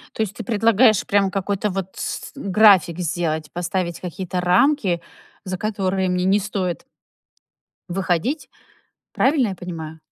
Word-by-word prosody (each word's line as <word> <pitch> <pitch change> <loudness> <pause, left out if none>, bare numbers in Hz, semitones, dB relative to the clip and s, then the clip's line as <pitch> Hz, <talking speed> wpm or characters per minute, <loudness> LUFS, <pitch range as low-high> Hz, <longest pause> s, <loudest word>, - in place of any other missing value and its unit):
То - - 0
есть 205 -2 -3
ты 230 - -7
предлагаешь 220 0 +3
прям 200 -1 +2
какой-то 200 +1 -1
вот 190 -1 -4
с - - -5
график 190 -4 +4
сделать, 165 -3 -2
поставить 175 0 -2
какие-то 180 0 -4
рамки, 180 - +2 0.4
за 185 -1 -3
которые 190 -2 -1
мне 180 0 0
не 195 +2 +4
стоит 185 -4 -3 1.1
Выходить, 195 - -1 0.6
правильно 270 -4 +2
я 195 - -4
понимаю? 160 -3 -7
190 Hz, 130 wpm, -21 LUFS, 175-210 Hz, 1.1 s, график